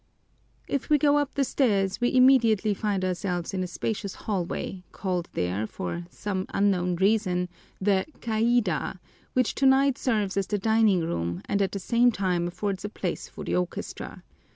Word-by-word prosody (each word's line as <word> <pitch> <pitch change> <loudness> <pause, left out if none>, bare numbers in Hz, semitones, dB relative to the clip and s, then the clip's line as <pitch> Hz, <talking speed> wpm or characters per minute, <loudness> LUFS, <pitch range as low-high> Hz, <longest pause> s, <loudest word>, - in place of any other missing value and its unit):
If 280 +1 -2
we 300 - +6
go 290 0 +4
up 290 -1 -2
the 280 - +2
stairs, 205 -8 +1
we 245 +1 +1
immediately 230 -5 +5
find 200 -2 -1
ourselves 180 0 -2
in 185 - -1
a 185 - -2
spacious 200 +2 -3
hallway, 190 -2 -3
called 180 -3 -3
there, 90 +5 -1
for 170 - -5
some 190 0 -3
unknown 180 -3 +1
reason, 190 -2 +1 0.3
the 195 +1 +2
caida, 220 -6 +1 0.4
which 255 -2 +2
tonight 270 0 +3
serves 210 -7 0
as 195 - 0
the 210 - 0
dining 220 -2 +3
room 85 - -2
and 200 - 0
at 195 - +1
the - - -2
same 240 +5 +3
time 180 -4 0
affords 190 +2 -3
a 205 - -3
place 185 -4 -4
for - - -9
the - - -1
orchestra. 180 -1 -4
200 Hz, 165 wpm, -26 LUFS, 180-230 Hz, 0.4 s, we